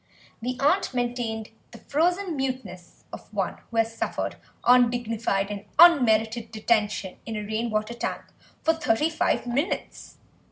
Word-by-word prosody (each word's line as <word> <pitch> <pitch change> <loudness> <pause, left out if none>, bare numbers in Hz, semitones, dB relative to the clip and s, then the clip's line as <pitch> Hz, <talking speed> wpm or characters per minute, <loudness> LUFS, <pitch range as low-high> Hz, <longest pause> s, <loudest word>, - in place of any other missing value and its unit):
The 250 +2 -3
aunt 290 0 +2
maintained 240 -3 -2 0.2
the 235 - -12
frozen 350 - 0
muteness 255 -10 -5
of - - -10
one - - -2
who 230 - -6
has 225 0 +1
suffered - - -3 0.3
undignified 230 -5 +2
and 205 0 -6
unmerited 230 -8 +5
detention 215 -3 0
in 225 - -4
a 210 - -3
rain 220 +3 -2
water 215 +1 -1
tank 240 - -4 0.4
for 320 - +4
thirty 315 -1 +1
five 320 -3 0
minutes. 270 +8 -3
235 Hz, 135 wpm, -26 LUFS, 220-270 Hz, 0.4 s, unmerited